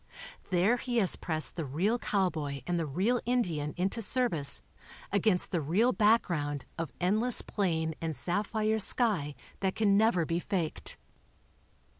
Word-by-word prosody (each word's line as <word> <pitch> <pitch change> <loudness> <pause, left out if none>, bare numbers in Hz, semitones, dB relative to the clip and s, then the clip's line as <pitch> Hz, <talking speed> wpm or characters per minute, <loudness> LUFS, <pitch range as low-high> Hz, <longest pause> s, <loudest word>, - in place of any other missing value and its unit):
There* 190 +7 +2
he 245 0 -3
has 195 -6 +3
pressed 155 -3 -1
the 165 - -3
real 180 - 0
cowboy 160 - -2
and 175 -1 -1
the 165 - -2
real 195 - 0
Indian 175 -12 -1
into 190 +6 -1
service 215 - +3 0.5
against 200 -1 +1
the 175 -4 0
real 195 - +2
background 170 - +1
of 165 -1 -4
endless 215 +7 +2
plain 160 -5 -1
and 160 -2 -3
sapphire 215 +5 -1
sky 195 - +1 0.2
that 190 -1 -1
can 200 -2 +3
never 210 -6 +3
be 165 +2 -1
faked. 175 -4 -4
185 Hz, 140 wpm, -30 LUFS, 160-220 Hz, 0.5 s, has